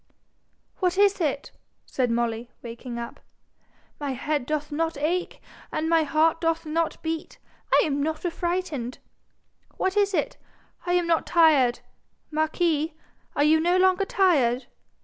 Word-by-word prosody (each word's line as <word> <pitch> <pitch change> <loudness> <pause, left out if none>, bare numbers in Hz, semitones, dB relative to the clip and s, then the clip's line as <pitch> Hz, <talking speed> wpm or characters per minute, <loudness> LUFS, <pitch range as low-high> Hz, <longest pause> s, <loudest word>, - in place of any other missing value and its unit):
'What 365 -1 0
is 400 -1 +4
it?' 285 -3 -1 0.3
said 255 -2 -1
Molly, 235 0 -1
waking 235 +1 -7
up. 235 0 -7 0.8
'My 285 -2 -2
head 285 0 -2
doth 300 0 -2
not 325 +1 -1
ache, 340 +5 -1 0.3
and 315 - -1
my 330 0 +4
heart 315 +2 +2
doth 330 0 0
not 320 +1 -1
beat, 320 0 -4
and - - -12
I - - 0
am 285 -2 -1
not 315 +3 -2
affrighted. 345 -7 -2 0.8
What 380 +1 0
is 405 -1 +2
it? - - -1 0.5
I 355 - +2
am 355 -1 +2
not 335 -1 +1
tired. 295 -8 +4 0.5
Marquis, 315 0 0 0.4
are 290 - +3
you 310 +2 +5
no 350 +3 +2
longer 375 +1 +3
tired? 275 -12 +2
315 Hz, 145 wpm, -25 LUFS, 280-345 Hz, 0.8 s, you